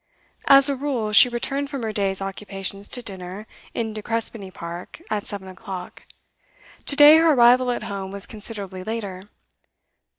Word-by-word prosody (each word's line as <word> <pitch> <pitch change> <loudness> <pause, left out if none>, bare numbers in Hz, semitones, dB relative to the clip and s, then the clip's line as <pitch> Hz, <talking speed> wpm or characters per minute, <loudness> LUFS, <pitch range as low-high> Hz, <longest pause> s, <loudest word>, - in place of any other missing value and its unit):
As 275 0 +8
a 280 - 0
rule, 255 -6 -2
she 210 +4 +8
returned 275 +4 -3
from 275 -4 -5
her 220 -1 -3
day's 195 -2 -1
occupations 195 0 -5
to 245 - -4
dinner, 190 0 -7 0.3
in 225 -2 -2
De 215 - -6
Crespigny 225 -2 -2
Park, 170 - -8
at 210 -1 -2
seven 200 -2 -5
o'clock. 185 -1 -9 0.8
To 280 - +2
day 295 +2 +9
her 325 -1 +5
arrival 250 0 +5
at 245 - -2
home 195 -1 -5
was 200 0 -1
considerably 200 -4 -7
later. 200 -3 -5
210 Hz, 160 wpm, -23 LUFS, 195-245 Hz, 0.8 s, day